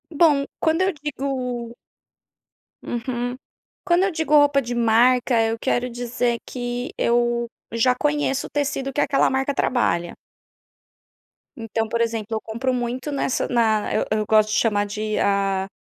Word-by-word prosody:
Bom, 295 -3 +4
quando 320 +2 +1
eu 380 +1 +2
digo 260 -5 -4 1.1
Uhum. 245 0 -3 0.5
Quando 355 0 +3
eu 390 - +1
digo 320 -2 -2
roupa 290 -1 +5
de 245 -1 -4
marca, 240 +1 +3
eu 225 0 0
quero 245 +2 0
dizer 240 0 -2
que 245 -1 -4
eu 240 0 +1 0.3
já 230 +2 +3
conheço 290 -1 0
o - - -18
tecido 275 -2 -2
que 280 - -3
aquela 275 - +2
marca 265 +2 0
trabalha. 175 -11 0 1.4
Então, 225 -1 -2
por 235 - -1
exemplo, 225 -2 -1
eu 220 - 0
compro 235 +4 -2
muito 250 +3 -3
nessa 275 -2 -1
na 225 -4 +1
eu - - +1
eu 215 0 +1
gosto 215 0 +4
de 215 - 0
chamar 205 -3 +1
de 215 +1 -3
a 195 -1 +1
245 Hz, 150 wpm, -22 LUFS, 225-275 Hz, 1.4 s, roupa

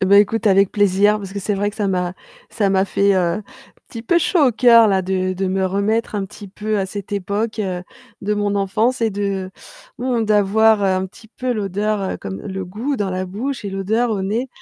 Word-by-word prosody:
Eh, 190 - +1
bah, 200 +1 +7
écoute 220 +2 +2
avec 195 -1 +4
plaisir, 205 +1 +3
parce 195 -2 -8
que 200 - -4
c'est 205 +2 -1
vrai 205 +1 -1
que - - -16
ça 205 -3 0
m'a 180 -1 -1 0.4
ça 205 -4 0
m'a 190 0 +3
fait, 200 0 +2
heu, - - +2
un 175 +3 0 0.5
petit 230 -3 -7
peu 340 +9 +3
chaud 320 -3 +3
au 250 - +2
coeur, 230 -1 +6
là, 195 -2 +2
de 185 0 -1
de 190 +1 -2
me 190 0 0
remettre 210 +4 -1
un 200 - -1
petit 205 +1 -10
peu 210 +2 -3
à 190 - -1
cette 200 0 -7
époque, 205 +3 -2
heu, 185 -3 -2 0.4
de 210 +1 0
mon 205 -1 0
enfance 215 +6 0
et 225 - +2
de 195 -2 -3 0.5
mmh, 245 -2 0
d'avoir, 215 +1 +3
heu, - - +3
un 185 0 +1
petit 220 +4 -16
peu 250 +3 -3
l'odeur, 210 0 -1
heu, - - -3
comme 95 0 -7
le 190 -1 -5
goût 225 +10 -3
dans 205 -3 -2
la 185 0 -3
bouche 230 +6 -4
et 200 - -3
l'odeur 215 +5 0
au 200 -3 -1
nez, 225 +7 -2
205 Hz, 235 wpm, -20 LUFS, 190-220 Hz, 0.5 s, bah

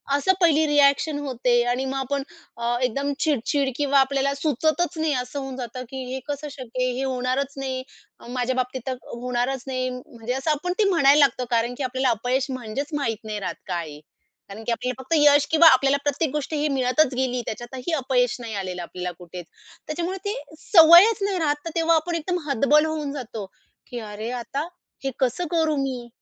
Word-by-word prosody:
असं 285 +7 +3
पहिली 315 -2 +4
रिअ‍ॅक्शन 290 +1 +3
होते 255 -3 -1
आणि 245 +2 0
मग 265 +1 -3
आपण 270 +1 -2 0.3
अ, 235 +1 0
एकदम 275 +4 0
चिडचिड 280 -1 +1
किंवा 280 0 +3
आपल्याला 275 +1 +1
सुचतंच 315 +4 0
नाही, 315 -1 +1
असं 250 +3 -6
होऊन 270 -1 -6
जातं, 250 0 -6
की 265 -1 -5
हे 265 - -3
कसं 290 +1 -4
शक्य 255 -1 -4
आहे, 255 - +1
हे 270 - -1
होणारंच 260 +1 -1
नाही, 260 -1 -3 0.5
माझ्याबाबतीत 255 0 -1
तर 260 - -1 0.2
होणारंच 245 +2 -2
नाही, 255 -1 -1
म्हणजे 250 -1 -6
असं 270 +4 0
आपण 355 +5 -1
ते - - +5
म्हणायला 295 -5 +5
लागतं 255 -3 +3
कारण 235 +1 +1
की 285 - -3
आपल्याला 260 0 0
अपयश 245 +4 0
म्हणजेच 255 +5 -5
माहीत 235 -7 -1
नाही 215 -1 -4
राहत 195 - -4
काय 170 -3 -3
आहे. 145 0 -10 0.5
कारण 210 +3 -9
की 235 - -2
आपल्याला 250 +2 -3
फक्त 265 - -3
यश 290 -1 +6
किंवा 325 +1 +7
आपल्याला 270 +2 +3
प्रत्येक 290 0 0
गोष्ट 300 0 -3
ही 300 0 +1
मिळतच 265 +1 +2
गेली. 250 -1 0
त्याच्यातही 250 +7 -5
अपयश 255 -4 +1
नाही 230 -2 -6
आलेलं 185 -2 -4
आपल्याला 180 +1 -5
कुठेच. 175 0 -9 0.4
त्याच्यामुळे 345 +4 -3
ते 405 +2 -1 0.2
सवयंच 345 +6 +7
नाही 395 -1 0
राहत, 295 -3 +2
तर - - -2
तेव्हा 330 0 +3
आपण 335 +2 0
एकदम 355 +3 -1
हतबल 280 +4 +4
होऊन 310 -2 -3
जातो, 225 -7 -6 0.4
की 245 - -6
अरे 215 +3 -5
आता 285 +6 -4 0.4
हे 270 - -1
कसं 270 +7 0
करू 320 -2 +2
मी? 260 -3 -3
270 Hz, 190 wpm, -24 LUFS, 245-295 Hz, 0.5 s, किंवा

